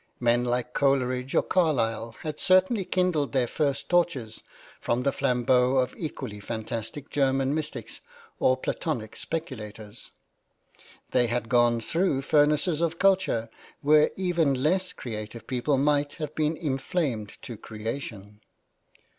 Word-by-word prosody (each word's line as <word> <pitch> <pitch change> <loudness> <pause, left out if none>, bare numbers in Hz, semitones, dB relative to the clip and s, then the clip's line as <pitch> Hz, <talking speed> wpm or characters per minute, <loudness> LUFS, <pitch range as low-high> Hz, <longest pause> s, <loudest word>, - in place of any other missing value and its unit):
Men 120 0 +3
like 125 0 -1
Coleridge 130 -2 +1
or - - +4
Carlyle 115 -10 0
had 155 -1 -4
certainly 185 +2 +3
kindled 175 -7 +1
their 130 -2 +3
first 140 +2 -1
torches 155 -11 0 0.4
from 120 +2 0
the 140 - +2
flambeaux 125 -1 +2
of 130 -1 +1
equally 110 -9 -6
fantastic 115 +5 -5
German 135 -1 +2
mystics 150 -7 -4 0.4
or 130 - +3
Platonic 130 -6 -3
speculators; 110 -9 -6 1.0
they 125 -1 +3
had 120 -1 -2
gone 120 -1 +3
through 165 - +1
furnaces 150 +3 +3
of 165 -1 0
culture 185 - +2 0.3
where 150 +1 +5
even 170 -7 +1
less 185 +4 +2
creative 110 -1 -7
people 130 +2 0
might 145 +1 +2
have 155 -2 -5
been 155 0 0
inflamed 135 - -2
to 120 - -6
creation. 105 -2 -7
135 Hz, 125 wpm, -27 LUFS, 120-155 Hz, 1.0 s, where